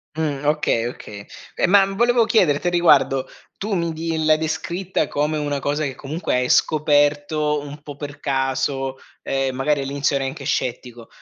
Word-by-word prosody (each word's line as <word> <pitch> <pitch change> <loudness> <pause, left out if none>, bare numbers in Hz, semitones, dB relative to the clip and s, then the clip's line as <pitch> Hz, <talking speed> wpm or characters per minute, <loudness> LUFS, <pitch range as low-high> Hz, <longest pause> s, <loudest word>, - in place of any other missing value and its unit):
Mh. 150 -3 -2
Okay, 150 -6 +1
oka 105 -4 -8 0.4
Ma, 195 +1 +6
volevo 235 +2 +3
chiederti 175 -9 +2
a - - +3
riguardo, 150 -6 +3 0.3
tu 210 +2 -4
mi 170 -2 -1
di 160 0 -2
l'hai 155 0 +5
descritta 170 +4 -2
come 150 +2 -1
una 145 -1 -2
cosa, 145 +2 -1
che 135 -2 -3
comunque 150 +7 -3
hai 125 0 0
scoperto, 150 0 +2
un 145 +1 -9
po' 145 -2 -9
per 145 0 -8
caso, 135 -1 -1 0.3
ehm, 135 -1 -1
magari, 140 +2 0
all'inizio 140 +1 -1
ero 135 -1 -1
anche 135 +1 -6
scettico. 120 -2 -3
145 Hz, 160 wpm, -21 LUFS, 135-160 Hz, 0.4 s, Ma